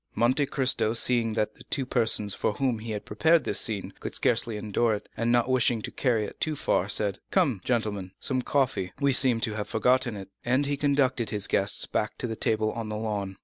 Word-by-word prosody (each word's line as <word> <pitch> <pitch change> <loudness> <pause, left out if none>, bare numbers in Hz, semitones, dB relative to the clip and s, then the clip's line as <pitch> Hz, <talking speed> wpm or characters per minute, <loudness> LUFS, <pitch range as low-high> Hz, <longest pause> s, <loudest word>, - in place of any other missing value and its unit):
Monte 130 +5 +2
Cristo, 130 -6 +1
seeing 115 -1 +1
that 110 -1 -1
the - - -16
two 135 - -1
persons 110 -5 +1
for 105 - -1
whom 125 -1 -1
he 115 +1 -8
had 105 -2 -4
prepared 160 +10 +3
this - - +1
scene 105 -4 -1
could - - -5
scarcely 115 -2 +1
endure 110 +2 0
it, 105 - -9
and 115 +1 0
not 120 0 +3
wishing 125 -2 +2
to - - -4
carry 115 -5 0
it - - -10
too 155 -1 0
far, 95 -8 0
said: 100 -1 +2
"Come, 115 -9 +1
gentlemen,—some 110 +1 -1
coffee, 125 -9 0
we 140 -1 +3
seem 125 -2 +4
to 110 -3 0
have 105 -1 -4
forgotten 125 0 +1
it," 95 0 -9
and 130 +4 +1
he 145 0 0
conducted 140 -4 +1
the 105 -2 -1
guests 100 0 +1
back - - -2
to - - -3
the 115 -2 -3
table 110 0 0
on 115 -2 -5
the 105 - -3
lawn. 100 -3 -3
115 Hz, 215 wpm, -27 LUFS, 105-130 Hz, -, seem